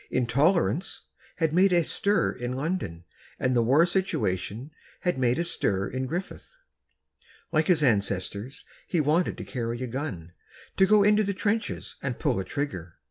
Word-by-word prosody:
"Intolerance" 155 +9 +1 0.3
had 160 -3 0
made 190 +3 +4
a 175 -1 +4
stir 205 0 +1
in 120 +1 -4
London, 130 - -3 0.4
and 130 -1 +1
the 120 - +4
war 135 +8 +4
situation 145 - -2 0.3
had 180 -7 0
made 125 -1 +2
a 170 - +1
stir 100 - 0
in 130 +1 -3
Griffith. 180 - -6 1.0
Like 155 -1 +2
his 165 -4 +4
ancestors, 100 +1 0 0.2
he 175 - 0
wanted 155 +4 +1
to - - -6
carry 120 -2 -4
a - - -1
gun—to 115 - -3
go 210 0 +5
into 210 +1 +4
the 200 -1 -2
trenches 220 +3 -2
and 130 -4 -3
pull - - 0
a - - -2
trigger. 95 - -4
145 Hz, 155 wpm, -27 LUFS, 115-180 Hz, 1.0 s, go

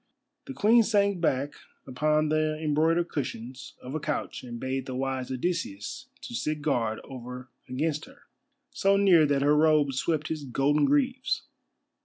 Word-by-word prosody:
The 270 - -7
Queen 225 +3 +5
sank 200 -4 +2
back 140 -3 0 0.3
upon 150 +4 +1
the 155 0 +1
embroidered 160 +3 +1
cushions 125 -2 -5
of 130 - -7
a 155 - -1
couch 150 0 -3
and 120 -2 -7
bade 130 +1 -3
the 130 - -4
wise 130 -1 -2
Odysseus 130 - -3 0.2
to 240 - -8
sit 155 -10 -2
guard 115 -7 0
over 125 -1 -9 0.2
against 150 +4 -1
her, 270 - -18 0.5
so 200 -7 +2
near 180 -6 +5
that 140 -1 +1
her 145 +1 +4
robes 150 -3 +3
swept 155 -2 -1
his 155 -2 -3
golden 140 +3 +2
greaves. 260 -3 +1
150 Hz, 155 wpm, -27 LUFS, 130-170 Hz, 0.5 s, Queen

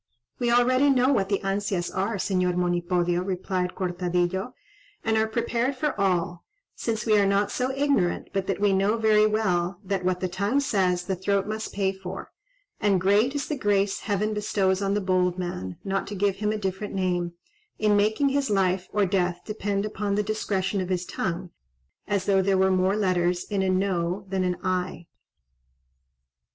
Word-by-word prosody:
'" 120 - -49
"We 240 -1 +1
already 255 +3 +4
know 260 -1 +4
what 195 -5 +1
the 200 - 0
ansias 195 -2 -2
are, 200 +4 0
Señor 180 -2 0
Monipodio," 175 0 +1
replied 185 -1 -2
Cortadillo, 180 +4 -1 0.5
"and 220 0 +1
are 220 0 +2
prepared 235 +3 -1
for 295 +2 -1
all; 175 -2 0 0.3
since 225 -2 -3
we 215 -2 +4
are 200 - +4
not 200 +1 +1
so 255 0 -1
ignorant 270 -10 0
but 195 -1 -1
that 195 - -1
we 205 -1 +3
know 200 +4 +2
very 215 -1 +4
well, 185 -4 0
that 195 -1 -2
what 180 0 0
the 185 - -1
tongue 200 +9 0
says, 185 -9 +1
the 190 +1 -2
throat 195 +2 0
must 215 +1 -4
pay 195 -1 0
for; 190 -1 -8 0.5
and 200 -3 +2
great 205 +9 +3
is 285 - -2
the 300 - -2
grace 205 -5 +1
heaven 210 +1 -1
bestows 200 -2 0
on 200 0 0
the 205 - 0
bold 185 -1 +1
man 95 - -4
(not 195 0 -2
to 205 - -5
give 200 0 +1
him 210 +1 0
a 215 - -1
different 195 0 -4
name), 175 -2 -1 0.4
in 210 -1 +3
making 215 +7 +2
his 275 0 0
life 190 -2 +1
or 205 -1 +2
death 180 -2 0
depend 205 -2 -2
upon 205 -1 -2
the 210 - +1
discretion 200 -2 -1
of 185 - -4
his 180 -1 -1
tongue, 175 0 -3 0.6
as 200 -2 0
though 195 -1 +3
there 195 0 +2
were 190 0 +3
more 185 +1 +2
letters 180 -3 +1
in 200 -2 -2
a 190 - +1
No 185 0 0
than 190 -1 0
an 180 -1 0
Aye." 185 -2 -2
195 Hz, 185 wpm, -26 LUFS, 185-210 Hz, 0.6 s, already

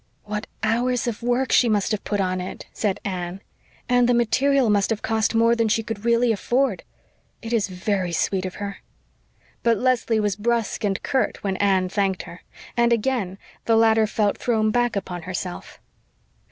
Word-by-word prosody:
"What 210 +1 -4 0.2
hours 240 +2 +1
of 235 -3 -3
work 245 +2 0
she 240 - +5
must 210 0 +1
have 215 - -2
put 205 - -2
on 185 -1 0
it," 180 - -7
said 205 -3 -1
Anne. 180 -1 -4 0.5
"And 245 -1 +3
the 245 - +4
material 265 +3 +2
must 200 -1 +2
have 225 -2 -2
cost 225 0 0
more 230 +1 +4
than 230 -1 +1
she 225 +1 +1
could 225 -1 -6
really 235 0 +3
afford. 240 +1 0 0.6
It 225 +1 -4
is 220 -4 +2
very 185 -1 -2
sweet 185 +2 0
of 185 -1 -5
her." 200 -1 -6 0.8
But 230 -1 +3
Leslie 245 -2 +1
was 205 -2 0
brusque 230 +1 -1
and 195 -2 -1
curt 265 - -1
when 195 -2 -1
Anne 190 -2 +2
thanked 195 -1 -1
her, 175 - -11 0.3
and 235 0 +3
again 225 -5 0 0.3
the 225 - +3
latter 225 -1 +4
felt 210 -1 0
thrown 220 -3 +1
back 240 0 +1
upon 180 -3 -4
herself. 180 +1 -6
220 Hz, 180 wpm, -23 LUFS, 195-235 Hz, 0.8 s, she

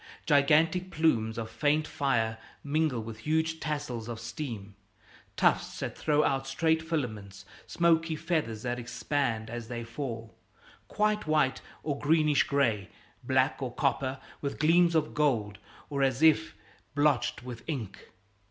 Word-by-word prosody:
Gigantic 160 +5 +3
plumes 115 -10 +1
of 115 -1 -3
faint 145 +7 +1
fire 115 -7 0 0.2
mingle 145 -5 0
with 110 0 -8
huge 160 +4 0
tassels 130 -8 -3
of 115 -1 -5
steam, 115 -4 -6 0.6
tufts - - +2
that - - -3
throw 150 -1 +2
out 135 -2 0
straight 160 -1 +1
filaments, 110 -12 -4 0.2
smoky 165 -1 +2
feathers 150 -10 -2
that 125 0 -2
expand 120 -1 -2
as 120 0 -6
they 120 -1 -5
fall 115 -1 -6 0.5
quite 210 -3 0
white 150 -4 +2 0.2
or 145 -2 -2
greenish 150 -1 +3
gray, 115 -9 +1 0.3
black - - +1
or - - -2
copper 130 0 0 0.2
with 140 - -3
gleams 170 +2 +4
of 155 -1 +1
gold, 115 -9 +1 0.3
or 140 -2 -2
as 135 +2 +1
if 160 -5 +4 0.4
blotched 145 -3 +2
with 120 -2 -7
ink. 125 - -5
140 Hz, 135 wpm, -29 LUFS, 115-155 Hz, 0.6 s, gleams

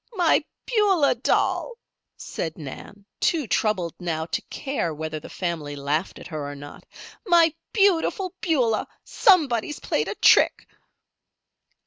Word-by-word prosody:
"My 350 -6 +3 0.2
Beulah 400 - +3
doll," 255 - 0 0.4
said 160 -2 -5
Nan, 175 +7 -10
too 320 -5 +1
troubled 195 -6 0
now 160 -3 -2
to 165 - -3
care 265 - -3
whether 155 0 -4
the - - -11
family 160 -5 -4
laughed 145 +5 -2
at - - -11
her 155 -4 -5
or - - -8
not. 145 +1 -12 0.4
"My 335 -3 +5 0.2
Beautiful 390 -2 +2
Beulah. 250 -10 +1 0.2
Somebody's 300 - +2
played - - -1
a - - -4
trick." - - +4
215 Hz, 125 wpm, -24 LUFS, -, 0.4 s, My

